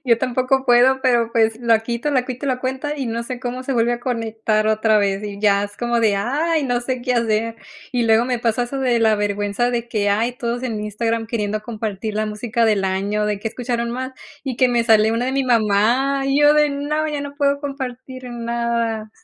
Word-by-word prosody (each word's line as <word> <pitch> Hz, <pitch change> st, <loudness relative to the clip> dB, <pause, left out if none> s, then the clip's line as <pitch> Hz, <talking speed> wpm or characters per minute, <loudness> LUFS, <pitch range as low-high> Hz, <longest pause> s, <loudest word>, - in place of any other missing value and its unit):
Yo 235 Hz, -2 st, +3 dB
tampoco 255 Hz, +1 st, 0 dB
puedo, 255 Hz, +1 st, +4 dB
pero 240 Hz, -3 st, +2 dB
pues 225 Hz, -1 st, +2 dB
la 230 Hz, -2 st, +3 dB
quito 235 Hz, +5 st, -3 dB
la 255 Hz, -3 st, +1 dB
quito 255 Hz, +2 st, -5 dB
la 255 Hz, -2 st, -1 dB
cuenta 265 Hz, +3 st, -3 dB
y 270 Hz, -4 st, -3 dB
no 230 Hz, +1 st, -2 dB
sé 250 Hz, +1 st, -6 dB
cómo 250 Hz, 0 st, -4 dB
se 270 Hz, -, -3 dB
vuelve 235 Hz, 0 st, +2 dB
a 240 Hz, -, -3 dB
conectar 225 Hz, -3 st, -1 dB
otra 215 Hz, 0 st, +3 dB
vez, 200 Hz, 0 st, 0 dB
y 200 Hz, -1 st, -6 dB
ya 200 Hz, -1 st, +3 dB
es 205 Hz, 0 st, -9 dB
como 240 Hz, -1 st, 0 dB
de: 210 Hz, -3 st, +3 dB
"Ay, 300 Hz, +9 st, 0 dB
no 245 Hz, -2 st, 0 dB
sé 250 Hz, 0 st, -3 dB
qué 250 Hz, 0 st, 0 dB
hacer". 230 Hz, -1 st, 0 dB, 0.4 s
Y 240 Hz, -2 st, +1 dB
luego 225 Hz, +1 st, +4 dB
me 250 Hz, -1 st, -1 dB
pasa 230 Hz, +1 st, 0 dB
eso 270 Hz, +3 st, -5 dB
de 250 Hz, -3 st, +2 dB
la 220 Hz, -1 st, +4 dB
vergüenza 205 Hz, +3 st, -1 dB
de 240 Hz, -1 st, -2 dB
que, 210 Hz, -3 st, 0 dB
ay, 225 Hz, +4 st, +1 dB
todos 240 Hz, +1 st, -3 dB
en 225 Hz, -4 st, -3 dB
Instagram 225 Hz, +2 st, -2 dB
queriendo 215 Hz, -2 st, -2 dB
compartir 215 Hz, -2 st, -4 dB
la 215 Hz, +1 st, 0 dB
música 225 Hz, +2 st, -1 dB
del 210 Hz, -3 st, +2 dB
año, 200 Hz, +3 st, -1 dB
de 210 Hz, -1 st, -1 dB
qué 225 Hz, +2 st, -3 dB
escucharon 235 Hz, 0 st, -3 dB
más, 260 Hz, +2 st, -4 dB, 0.3 s
y 260 Hz, -4 st, -3 dB
que 255 Hz, -1 st, +4 dB
me 235 Hz, -1 st, +1 dB
sale 220 Hz, -1 st, +4 dB
una 240 Hz, +2 st, -1 dB
de 260 Hz, -, -1 dB
mi 275 Hz, 0 st, 0 dB
mamá, 240 Hz, +4 st, +2 dB
y 275 Hz, +1 st, +2 dB
yo 295 Hz, 0 st, +6 dB
de: 300 Hz, -1 st, +4 dB
"No, 295 Hz, +2 st, -1 dB
ya 295 Hz, -1 st, -3 dB
no 285 Hz, 0 st, -6 dB
puedo 280 Hz, -1 st, +1 dB
compartir 260 Hz, -2 st, -6 dB
nada". 235 Hz, -2 st, -2 dB
235 Hz, 225 wpm, -20 LUFS, 220-255 Hz, 0.4 s, yo